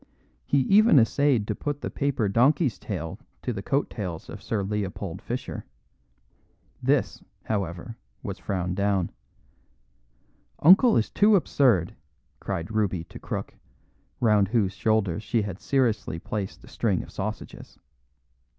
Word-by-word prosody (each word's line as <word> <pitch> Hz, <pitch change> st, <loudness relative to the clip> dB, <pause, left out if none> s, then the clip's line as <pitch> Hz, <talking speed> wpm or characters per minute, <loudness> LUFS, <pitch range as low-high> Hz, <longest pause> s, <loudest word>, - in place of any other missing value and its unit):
He 140 Hz, -, +3 dB
even 200 Hz, -, +5 dB
essayed 130 Hz, -1 st, +3 dB
to 105 Hz, -, -1 dB
put 145 Hz, +6 st, -4 dB
the -, -, -4 dB
paper 140 Hz, -6 st, 0 dB
donkey's 125 Hz, -, +2 dB
tail 95 Hz, -2 st, -5 dB, 0.2 s
to 125 Hz, -, -1 dB
the 100 Hz, -, -5 dB
coat 140 Hz, +7 st, 0 dB
tails 90 Hz, -6 st, -6 dB
of 100 Hz, -, -8 dB
Sir 105 Hz, -2 st, -2 dB
Leopold 100 Hz, -3 st, -4 dB
Fischer. -, -, -5 dB, 1.2 s
This, -, -, +1 dB, 0.2 s
however, 100 Hz, +2 st, -3 dB, 0.3 s
was -, -, -5 dB
frowned 90 Hz, -2 st, -2 dB
down. 100 Hz, -3 st, +1 dB, 1.5 s
"Uncle 195 Hz, -, +7 dB
is 110 Hz, -, 0 dB
too 210 Hz, +1 st, +5 dB
absurd," 125 Hz, -, +2 dB, 0.4 s
cried 85 Hz, +6 st, -4 dB
Ruby 100 Hz, -6 st, 0 dB
to -, -, -12 dB
Crook, -, -, -5 dB, 0.7 s
round 105 Hz, -4 st, +4 dB
whose 100 Hz, -3 st, +1 dB
shoulders 110 Hz, -4 st, +1 dB
she 115 Hz, 0 st, 0 dB
had 100 Hz, -2 st, -5 dB
seriously 120 Hz, -, 0 dB
placed 100 Hz, +3 st, -5 dB
a -, -, -14 dB
string 100 Hz, -7 st, 0 dB
of -, -, -13 dB
sausages. 105 Hz, +2 st, -6 dB
105 Hz, 130 wpm, -26 LUFS, 95-125 Hz, 1.5 s, Uncle